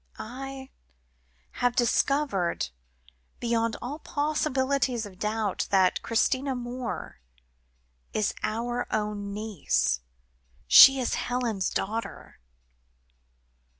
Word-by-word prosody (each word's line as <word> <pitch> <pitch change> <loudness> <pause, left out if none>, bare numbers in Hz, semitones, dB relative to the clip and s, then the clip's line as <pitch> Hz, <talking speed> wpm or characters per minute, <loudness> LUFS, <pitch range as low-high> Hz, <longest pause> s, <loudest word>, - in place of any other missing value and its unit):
I 265 +3 -7 0.9
have 245 0 +2
discovered 240 - +1 0.7
beyond 230 -1 0
all 280 +5 -5
possibilities 275 -5 0
of 190 -3 -12
doubt, 215 -2 -1
that 190 -2 +3
Christina 260 +4 0
Moore 245 - -5 0.9
is 215 -2 0
our 240 +3 -2
own 210 -2 -2
niece. 200 - 0 0.7
She 270 0 +9
is 250 - -1
Helen's 235 -6 -1
daughter." 225 +3 -4
235 Hz, 85 wpm, -27 LUFS, 210-260 Hz, 0.9 s, She